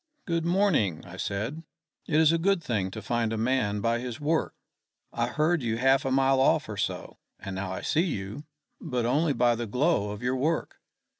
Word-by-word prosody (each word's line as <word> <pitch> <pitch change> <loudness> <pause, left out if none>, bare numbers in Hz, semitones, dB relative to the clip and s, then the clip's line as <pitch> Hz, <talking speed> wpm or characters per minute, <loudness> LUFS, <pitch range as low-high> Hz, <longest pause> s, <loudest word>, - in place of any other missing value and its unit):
"Good 165 -2 -1
morning," 170 - +1
I 90 - -10
said. 110 +12 -3 0.5
"It 155 -1 +2
is 160 -1 +5
a 165 - +1
good 190 0 +1
thing 100 -8 -1
to 105 +2 -8
find 115 -1 0
a 110 - -2
man 110 -3 0
by 115 +2 +1
his 120 -2 -6
work. 155 +2 0 0.6
I 120 0 0
heard 155 +6 +1
you 115 -2 -1
half 135 +3 +3
a 135 - 0
mile 135 0 +3
off - - +3
or - - -5
so, - - -3 0.2
and 100 -1 -6
now 95 0 -3
I 95 - -4
see 165 +4 +1
you, 120 - -5 0.3
but 125 -7 -2
only 145 +5 +2
by 120 -2 +3
the 120 0 -4
glow 125 -2 +1
of 105 +3 -7
your 125 +1 +1
work. 155 +5 -1
125 Hz, 205 wpm, -27 LUFS, 110-155 Hz, 0.6 s, is